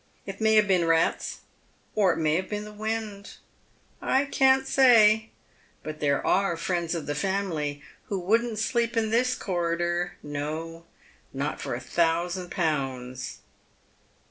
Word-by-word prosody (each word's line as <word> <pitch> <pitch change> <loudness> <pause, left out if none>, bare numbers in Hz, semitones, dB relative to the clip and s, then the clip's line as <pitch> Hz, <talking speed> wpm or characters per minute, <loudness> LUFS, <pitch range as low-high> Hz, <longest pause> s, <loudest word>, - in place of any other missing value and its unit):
It 195 +1 -7
may 220 0 +4
have 210 -1 +5
been 185 -3 +3
rats, 165 0 +1 0.5
or 195 -5 +3
it - - -6
may 155 -1 +1
have 185 - -4
been 210 0 -3
the 210 0 -10
wind. 215 -1 -4 0.7
I 270 +2 +2
can't 265 -1 +3
say. 220 -4 +5 0.5
But 155 0 -6
there 140 -2 +1
are 195 -3 +2
friends 170 0 -1
of 165 - -4
the 145 - -2
family 155 -4 -2 0.2
who 200 - -3
wouldn't 225 +5 +1
sleep 235 +1 0
ic 220 -1 +1
this 250 +2 +2
corridor, 175 -1 -1
no, 155 +3 -5 0.5
not - - -3
for - - -3
a - - -4
thousand 175 +2 0
pounds." 130 -7 -3
180 Hz, 145 wpm, -26 LUFS, 165-215 Hz, 0.7 s, have